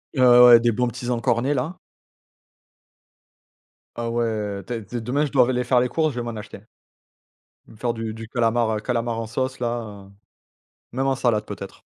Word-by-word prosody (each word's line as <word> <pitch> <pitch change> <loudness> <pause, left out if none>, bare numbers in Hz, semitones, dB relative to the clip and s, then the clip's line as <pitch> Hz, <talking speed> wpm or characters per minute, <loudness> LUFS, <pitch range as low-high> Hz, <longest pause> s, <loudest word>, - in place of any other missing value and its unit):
Ouais, 130 - +1
ouais, 125 0 +8
ouais, 120 -1 +9
des 120 0 +2
bons 125 +3 0
petits 125 0 -5
encornets 120 +4 +1
là. 145 +7 -3 2.2
Ah 115 0 -3
ouais, 110 -4 -2
tè 115 -3 -5
t 120 +4 -6
demain 140 +6 0
je 140 - -6
dois 125 -3 +5
v - - -3
aller 125 -1 0
faire 125 0 +3
les 125 0 +1
courses, 155 0 0
je 120 - -4
vais - - -3
m'en 120 -1 -5
acheter. 105 -1 -9 1.1
Je - - -20
vais - - -13
me - - -16
faire 120 +1 -2
du 115 -1 -4
du 115 0 -8
calamar, 120 -1 +1
heu, - - -3
calamar 115 0 -2
en 115 - -3
sauce 130 +2 -3
là, 115 -5 -4
heu, - - -18 0.8
même 135 +3 -1
en 135 - +1
salade 120 -5 0
peut-être. - - -9
120 Hz, 205 wpm, -23 LUFS, 115-125 Hz, 2.2 s, ouais